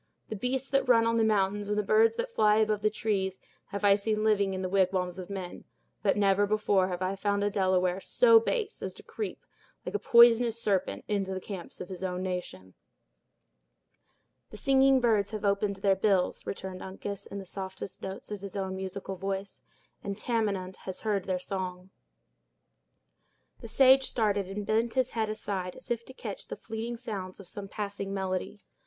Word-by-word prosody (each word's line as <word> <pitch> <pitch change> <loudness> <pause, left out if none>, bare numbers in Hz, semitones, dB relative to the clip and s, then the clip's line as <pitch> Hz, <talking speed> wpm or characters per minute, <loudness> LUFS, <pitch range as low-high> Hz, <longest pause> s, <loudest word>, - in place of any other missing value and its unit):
The 220 - -3
beasts 255 +5 -1
that 275 -2 +2
run 230 -2 +6
on 230 0 +2
the 225 - +3
mountains, 205 -1 +1
and 210 - 0
the 210 - +2
birds 450 - +4
that 480 +1 -3
fly 210 - +4
above 215 -1 +2
the 215 - +3
trees, 195 -3 -1 0.3
have 200 0 -3
I 200 - +7
seen 215 +1 0
living 200 -3 +2
in 190 - -3
the - - 0
wigwams 185 -1 +1
of 185 - -7
men; 190 -3 -6 0.4
but - - +2
never 200 0 +3
before 205 -3 +2
have 180 0 -3
I 185 +1 -1
found 200 +1 0
a 205 - +1
Delaware 185 -2 +2
so 460 - +6
base 450 -1 -2
as - - -5
to - - -13
creep, 430 - -6 0.4
like - - -4
a 415 - 0
poisonous 235 -1 +6
serpent, 200 -5 -1
into 195 -2 -1
the - - -2
camps 190 -2 -7
of 180 - -7
his 185 -1 -7
nation." 180 - -4 1.8
"The - - -10
singing 270 +1 +4
birds 215 -4 +2
have 215 -1 -4
opened 200 0 +1
their 195 0 +2
bills," 190 -2 +1
returned 190 -1 -5
Uncas, 195 +1 -6
in 200 - -7
the 195 - -6
softest 190 0 -6
notes 190 +2 -7
of 205 -2 -5
his 200 -1 -7
own 190 -1 -2
musical 190 0 -5
voice; 195 +1 -4 0.4
"and 200 0 -4
Tamenund 205 -5 -1
has 190 -1 -7
heard 205 -4 0
their 185 -1 0
song." 185 0 -5 1.7
The - - -9
sage 265 +3 +5
started, 205 -5 +1
and 200 +2 -5
bent 225 +3 +1
his 260 -1 +1
head 220 -2 -1
aside, 195 -4 -3
as - - -11
if 235 -1 -1
to 260 - -10
catch - - -7
the - - -6
fleeting 230 +2 -5
sounds 205 -7 -6
of 195 - -11
some 200 +2 -6
passing 200 -1 -4
melody. 190 +1 -3
200 Hz, 185 wpm, -29 LUFS, 190-220 Hz, 1.8 s, I